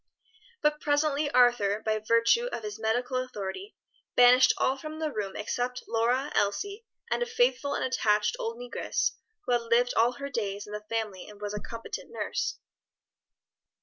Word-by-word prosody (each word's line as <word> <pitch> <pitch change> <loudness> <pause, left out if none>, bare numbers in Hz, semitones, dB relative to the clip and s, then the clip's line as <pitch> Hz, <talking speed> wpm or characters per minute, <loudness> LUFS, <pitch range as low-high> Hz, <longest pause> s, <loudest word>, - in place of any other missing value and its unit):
But 300 0 +2
presently 290 0 +1
Arthur, 240 -5 +4
by 215 0 +1
virtue 230 - +3
of 235 - -5
his 210 0 -6
medical 245 +4 0
authority, 255 - -5 0.4
banished 250 +1 +7
all 260 - +2
from 310 +3 -7
the 315 -1 -2
room 205 -5 -4
except 245 +4 -3
Lora, 245 +5 +1
Elsie, 400 - -1 0.2
and - - +1
a 485 - 0
faithful 465 -12 +1
and - - -1
attached 210 -5 +2
old 230 +1 -3
negress 245 0 -1 0.3
who - - -2
had 240 -1 +3
lived 235 +1 +2
all 235 +2 +4
her 280 +3 -6
days 205 -4 -3
in 210 - -10
the 210 - -4
family 215 -5 -3
and 210 -1 -13
was 205 0 -4
a 210 - -3
competent 230 +2 -7
nurse. - - -2
245 Hz, 165 wpm, -28 LUFS, 215-280 Hz, 0.4 s, banished